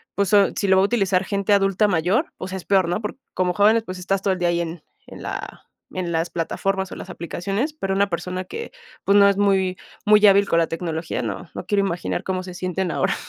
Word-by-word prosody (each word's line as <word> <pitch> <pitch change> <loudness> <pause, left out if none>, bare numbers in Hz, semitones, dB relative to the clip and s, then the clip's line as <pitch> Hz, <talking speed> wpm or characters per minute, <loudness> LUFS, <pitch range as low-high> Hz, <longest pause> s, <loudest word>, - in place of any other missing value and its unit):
pues, 200 -1 +1
so 205 -2 +5
si 200 - -1
lo 190 - +5
va 190 - +5
a - - +4
utilizar 195 -4 +1
gente 200 +1 0
adulta 195 +1 +3
mayor, 190 - +1
o 185 - -6
sea, 190 0 -5
es 180 - -9
peor, 190 -3 +3
¿no? 180 +5 -1
Porque 210 +4 -5 0.2
como 180 -1 0
jóvenes, 215 +4 +4
pues, 185 0 -6
estás 195 +1 -1
todo 195 - +2
el 185 - -5
día 175 -1 +1
ahí 170 0 +1
en 165 -1 -6 0.2
en - - -11
la - - -6 0.3
en 180 -2 -3
las 165 +1 0
plataformas 190 +3 -2
o - - -6
las 185 - -9
aplicaciones, 195 - -3
pero 195 -11 -3
una 200 0 +2
persona 180 +2 -4
que, 460 - -7 0.3
pues, 200 +1 +4
no 200 0 +7
es 200 - 0
muy 190 -2 +2 0.3
muy 210 0 +6
hábil 200 0 +5
con 170 - +3
la 165 - +2
tecnología, 165 -3 -3
no, 110 - -5
no - - -6
quiero 200 -1 +1
imaginar 175 0 -3
cómo 185 -1 -2
se 180 -1 -8
sienten 185 0 -2
ahora. 190 +3 0
190 Hz, 245 wpm, -22 LUFS, 180-200 Hz, 0.3 s, no